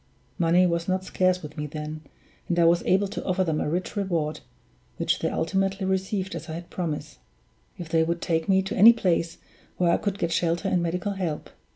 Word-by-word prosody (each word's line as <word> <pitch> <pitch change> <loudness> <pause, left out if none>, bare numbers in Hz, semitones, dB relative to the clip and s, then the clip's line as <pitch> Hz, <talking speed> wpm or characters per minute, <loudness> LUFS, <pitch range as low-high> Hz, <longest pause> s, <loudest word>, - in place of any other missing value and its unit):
Money 175 +2 +4
was 170 -1 0
not 185 0 0
scarce 185 -1 +1
with 150 0 -9
me 150 0 -3
then, 155 +1 -6 0.5
and 175 - 0
I 170 - +5
was 170 +1 +4
able 195 +2 +3
to 210 - -5
offer 185 0 +1
them 160 -4 -1
a - - -1
rich 175 +3 -2
reward 170 -7 -1 0.6
(which - - 0
they - - 0
ultimately 195 +2 -1
received 190 +1 -1
as 165 - -7
I - - -4
had 170 +1 -8
promised) 155 -4 -4 0.6
if 175 - -7
they 165 0 +3
would 170 +1 0
take 160 0 -1
me 190 0 +4
to 195 - -4
any 225 +5 +9
place 170 -6 0 0.4
where 175 -2 +3
I - - +3
could 200 -1 -2
get 170 -4 -1
shelter 170 +3 0
and 180 -2 +1
medical 175 +4 -1
help. 180 -6 -4
175 Hz, 210 wpm, -26 LUFS, 165-190 Hz, 0.6 s, any